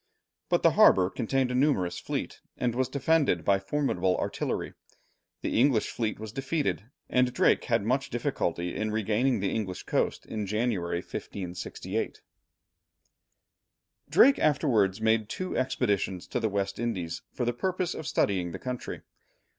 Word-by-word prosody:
But - - +2
the - - +6
harbour 95 -1 +5
contained 130 +2 0
a - - -2
numerous 125 - +1
fleet, - - -4 0.2
and 120 -2 0
was 130 +1 0
defended 140 - +2
by 100 -1 +4
formidable 95 -5 0
artillery. - - -2 0.7
The - - 0
English 125 -4 +3
fleet 110 -2 -2
was 110 -1 -6
defeated, 135 - -1 0.2
and 125 0 +2
Drake - - +3
had 100 - +1
much 130 +4 0
difficulty 90 - -2
in 110 +1 -1
regaining 110 +2 +1
the 100 - 0
English 95 -5 -3
coast - - -1
in 105 -2 -4
January, 100 -5 -1
1568. 90 -2 -5 1.9
Drake 275 +3 +6
afterwards 115 - +2
made 110 -1 +2
two 185 0 -4
expeditions 105 -8 0
to - - -1
the 110 -2 0
West 100 0 -2
Indies 90 -8 -3
for 125 - -2
the 120 - 0
purpose 185 +6 -1
of 155 - -6
studying 90 -4 0
the - - -4
country. 125 -1 -5
110 Hz, 145 wpm, -28 LUFS, 95-130 Hz, 1.9 s, the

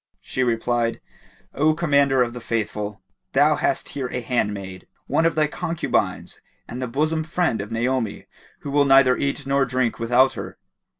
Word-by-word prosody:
She 130 - -4
replied, 120 -1 0 0.5
"O 155 +2 +2
Commander 140 -5 +3
of 120 -1 -4
the 125 - -7
Faithful, 105 -3 -3 0.3
thou 145 +3 +4
hast 135 - -1
here 135 -3 -4
a 125 - -4
handmaid, 100 -6 -3 0.2
one 165 - +2
of 165 - -1
thy 155 -1 +3
concubines 165 +2 -2 0.3
and 125 +2 -6
the 125 - -2
bosom 155 +6 0
friend 160 - 0
of 105 +2 -8
Naomi 120 -1 -1 0.4
who 140 - -6
will 145 0 +3
neither 135 -2 +6
eat 140 +1 -2
nor 140 0 +2
drink 125 -2 -1
without 125 +3 +3
her." - - -7
130 Hz, 165 wpm, -23 LUFS, 115-145 Hz, 0.5 s, neither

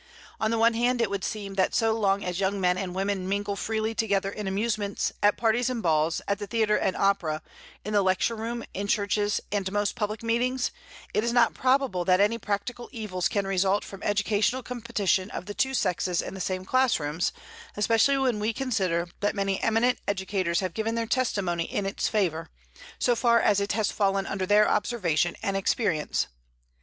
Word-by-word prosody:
On 220 - +1
the 230 - 0
one 230 +1 +4
hand, 240 +2 +1
it 225 -4 +1
would 200 -1 -2
seem 200 -2 -4
that - - 0
so 225 -1 +3
long 200 -2 +1
as 180 0 -2
young 200 +1 0
men 180 -1 +2
and 185 -1 -4
women 190 -1 -1
mingle 200 0 -1
freely 220 +2 -2
together 200 -3 0
in 210 -1 -5
amusements, 205 0 -1
at 205 0 +4
parties 235 +2 +2
and 245 -3 -3
balls, 160 -1 +2
at 200 0 0
the 205 - -5
theatre 220 -1 +2
and 190 - 0
opera, 180 -6 +1 0.4
in 210 - -3
the 205 - +4
lecture 190 +4 +1
room, 230 +1 -4
in 200 +1 -3
churches, 205 0 +1
and 195 -2 -1
most 205 0 0
public 215 -1 -3
meetings, 245 +3 0 0.4
it 210 - +1
is 235 - 0
not 240 0 +4
probable 255 -8 +1
that 185 +1 +3
any 210 +3 +2
practical 225 +4 -4
evils 195 -7 -2
can 200 +2 -1
result 195 +1 +1
from 195 - -10
educational 210 +5 +1
competition 215 -6 -1
of - - -6
the 205 - -6
two 265 +4 0
sexes 180 -4 0
in - - -3
the 190 - -6
same 185 0 -2
class 255 0 +2
rooms, 150 +3 -1 0.5
especially 225 +6 +3
when 255 -5 +1
we 215 +2 0
consider 190 -10 0
that 205 +1 0
many 195 -1 -1
eminent 230 +3 +2
educators 190 -3 0
have 185 -3 -3
given 225 +1 -2
their 230 0 -1
testimony 200 -9 0
in 205 - -3
its 195 - -1
favor, 170 -6 -1 0.5
so 245 - +2
far 235 0 +4
as 205 -2 +3
it 200 0 -1
has 220 -2 0
fallen 195 -1 +1
under 190 -2 -3
their 210 +1 +5
observation 175 -7 +1
and 195 -3 -1
experience. 195 -5 0
205 Hz, 195 wpm, -27 LUFS, 190-225 Hz, 0.5 s, their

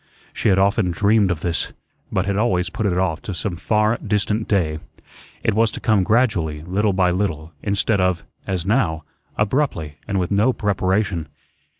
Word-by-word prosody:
She - - +1
had 95 - +4
often 100 0 +2
dreamed 100 +3 +3
of 85 -3 -2
this, 85 -1 -2 0.4
but 95 - 0
had 100 -1 -1
always 90 -5 +1
put 110 +1 -1
it 90 -2 0
off 85 -4 0
to 100 - -5
some 95 0 -3
far 105 +5 +1
distant 105 +1 0
day. 80 -6 +1 0.6
It - - +2
was 110 +2 +3
to - - -5
come 110 -4 +3
gradually, 90 -9 +1
little 100 +5 +1
by 95 -1 +2
little, 85 -4 -2
instead 100 0 +1
of, 90 -2 +1 0.2
as 90 -3 -2
now, 95 - +1 0.3
abruptly 105 - 0
and 100 -1 0
with 90 +1 -2
no 105 +6 +3
preparation. 95 -5 0
95 Hz, 175 wpm, -21 LUFS, 90-105 Hz, 0.6 s, had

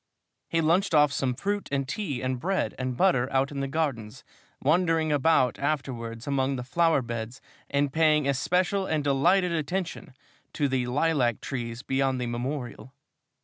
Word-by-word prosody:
He 165 - +1
lunched 170 +3 +2
off 150 -1 +5
some 130 -3 -1
fruit 205 +7 -3
and 140 -1 -1
tea 145 - -3
and 130 -1 -1
bread 190 +6 -1
and 130 -1 -3
butter 135 -9 +2
out 135 +1 +1
in 140 - -4
the 140 - -1
gardens, 135 -8 -3 0.4
wandering 160 +1 +2
about 145 -2 +2
afterwards 125 -6 -3
among 135 -1 0
the 125 - -4
flower 165 +1 +2
beds 115 +1 -5 0.3
and 140 -1 0
paying 155 -3 +3
especial 180 +8 +1
and 155 -2 0
delighted 175 +7 +3
attention 165 -3 -3 0.4
to 145 - +1
the 130 -2 -1
lilac 130 -4 +1
trees 120 -2 -5
beyond 135 -1 0
the 125 - -2
Memorial. 120 0 -5
140 Hz, 155 wpm, -27 LUFS, 130-160 Hz, 0.4 s, off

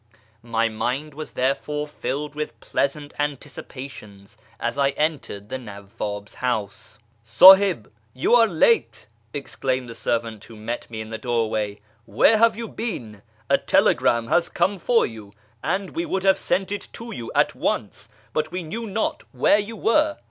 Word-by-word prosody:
My 115 -1 0
mind 125 +7 -3
was 155 +2 -8
therefore 140 +3 -1
filled 145 +1 -4
with 150 0 -5
pleasant 145 +1 -2
anticipations 135 -7 -6 0.2
as 120 - -2
I 140 -1 +3
entered 150 -10 -2
the 130 - -4
Nawwab's 105 -2 -7
house. 110 -6 -3
" 115 - -39
S;ihib, 185 - +7 0.3
you 130 - +1
are 235 -2 +7
late," 160 - +2 0.3
exclaimed 130 -2 -3
the 115 - -7
servant 115 -2 -2
who 115 - -13
met 110 +3 -5
me 110 -1 -5
in 110 0 -8
the 110 - -4
doorway; 110 -4 -1
" 110 0 -37
where 220 0 +6
have 230 -1 +5
you 230 -1 -4
been? 115 - -6 0.3
A - - +3
telegram 115 -1 +3
has 175 0 +2
come 190 +3 0
for 235 +5 +3
you, 110 -3 -9 0.3
and 195 0 -1
we 335 +1 -3
would 190 -7 -1
have 190 -1 +4
sent 195 +1 -1
it 205 - -4
to 230 0 -8
you 120 - -6
at - - +3
once, - - -3 0.2
but 155 0 -1
we 180 0 -4
knew 225 +9 -5
not 215 +2 -2
where 205 - +4
you 215 +2 -5
were." 300 +8 +2
135 Hz, 165 wpm, -23 LUFS, 115-190 Hz, 0.3 s, S;ihib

